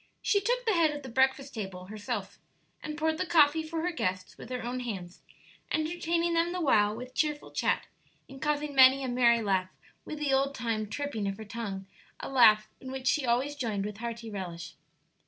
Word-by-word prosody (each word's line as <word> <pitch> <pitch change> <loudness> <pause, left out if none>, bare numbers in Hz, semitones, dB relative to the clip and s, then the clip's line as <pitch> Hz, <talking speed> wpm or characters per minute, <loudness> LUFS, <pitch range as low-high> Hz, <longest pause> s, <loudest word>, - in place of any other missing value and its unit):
She 405 - +3
took - - 0
the 445 - +3
head 335 -3 +4
of 295 -1 -5
the 260 - -7
breakfast 265 +2 +1
table 190 -5 -6
herself, 210 0 -5 0.4
and 305 0 -5
poured 315 +1 0
the - - 0
coffee 320 -1 +5
for 320 +1 -4
her 360 - 0
guests 185 - -3
with - - -11
her 250 -1 -4
own 245 +2 -3
hands, 190 -8 -6 0.5
entertaining 335 +1 0
them 335 +1 +1
the 365 - -2
while 215 -9 +3
with 250 +2 -8
cheerful 300 -1 -1
chat, - - 0 0.4
and 270 -1 -12
causing 295 -1 -1
many 265 0 +7
a - - -2
merry 240 -2 +3
laugh 190 -2 +1 0.3
with 305 - -6
the 295 -2 0
old 275 +1 +2
time 225 -3 -2
tripping 280 -6 -3
of 195 0 -3
her 220 - -8
tongue 205 -3 -5 0.3
a - - -6
laugh 220 -5 +6
in 260 - -8
which 265 -1 -6
she 265 -1 +2
always 255 +5 +1
joined 215 -7 -2
with 210 -1 -5
hearty 230 0 -5
relish. 170 -4 -6
255 Hz, 200 wpm, -29 LUFS, 215-300 Hz, 0.5 s, many